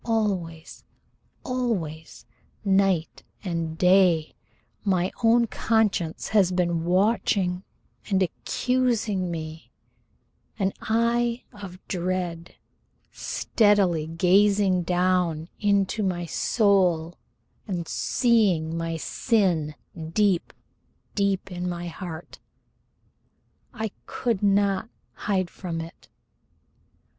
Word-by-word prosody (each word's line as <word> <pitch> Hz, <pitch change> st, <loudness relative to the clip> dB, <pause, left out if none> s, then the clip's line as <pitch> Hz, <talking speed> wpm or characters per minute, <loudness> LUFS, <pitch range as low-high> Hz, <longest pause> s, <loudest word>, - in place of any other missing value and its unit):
Always 190 Hz, -8 st, -2 dB, 0.6 s
always 195 Hz, -12 st, -3 dB, 0.4 s
night 190 Hz, -4 st, +2 dB, 0.2 s
and 165 Hz, -4 st, -3 dB
day 180 Hz, -3 st, +4 dB, 0.5 s
my 185 Hz, -2 st, +1 dB
own 235 Hz, +1 st, +5 dB
conscience 215 Hz, -8 st, 0 dB
has 200 Hz, -4 st, +4 dB
been 170 Hz, -2 st, 0 dB
watching 185 Hz, -1 st, +1 dB, 0.5 s
and 195 Hz, -2 st, +3 dB
accusing 225 Hz, -2 st, 0 dB
me, 160 Hz, -1 st, -6 dB, 0.9 s
an 195 Hz, -2 st, 0 dB
eye 235 Hz, +2 st, +1 dB
of 195 Hz, -3 st, -9 dB
dread 180 Hz, -2 st, -3 dB, 0.6 s
steadily 195 Hz, -8 st, +2 dB
gazing 190 Hz, +3 st, +3 dB
down 175 Hz, -2 st, +1 dB
into 200 Hz, 0 st, +1 dB
my 180 Hz, -3 st, -1 dB
soul 180 Hz, -4 st, +2 dB, 0.5 s
and 175 Hz, -4 st, -3 dB
seeing 195 Hz, -10 st, +2 dB
my 165 Hz, 0 st, -2 dB
sin 170 Hz, -, 0 dB, 0.4 s
deep, 195 Hz, -3 st, +2 dB, 0.6 s
deep 195 Hz, -2 st, 0 dB
in 180 Hz, 0 st, -3 dB
my 175 Hz, 0 st, -4 dB
heart. 170 Hz, -1 st, -8 dB, 1.3 s
I 220 Hz, -4 st, -4 dB, 0.2 s
could 235 Hz, -6 st, -1 dB
not 200 Hz, +1 st, +2 dB, 0.2 s
hide 190 Hz, -4 st, -1 dB
from 170 Hz, -3 st, -5 dB
it. 165 Hz, +1 st, -10 dB
185 Hz, 85 wpm, -25 LUFS, 170-205 Hz, 1.3 s, own